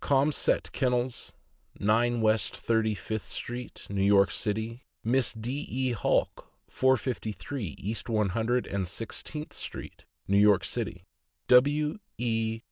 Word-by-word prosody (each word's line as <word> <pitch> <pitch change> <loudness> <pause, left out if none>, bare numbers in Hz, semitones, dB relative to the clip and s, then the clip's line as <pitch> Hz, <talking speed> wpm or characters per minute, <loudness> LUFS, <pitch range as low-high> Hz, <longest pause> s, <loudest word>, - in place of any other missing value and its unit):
Caumsett 140 +2 +2
Kennels, 125 -1 -1 0.5
9 115 +3 +2
West 110 0 +2
Thirty 110 -2 +1
fifth 110 +1 -4
street, 125 0 -6
New 100 -1 -2
York 100 -2 +5
City; 110 +3 -2 0.2
Miss 125 +1 +3
D. 120 +6 -4
E 130 -1 0
Halk, 115 - 0 0.2
453 120 - -1
East 110 +4 -3
One 105 -3 +2
Hundred 115 +5 0
and 100 -2 -2
Sixteenth 115 - -5
street, - - -7 0.2
New 100 +1 +4
York 100 -2 +5
City; 95 -3 -3 0.4
W. 145 +7 +4 0.2
E. 115 -1 0
115 Hz, 125 wpm, -28 LUFS, 105-125 Hz, 0.5 s, York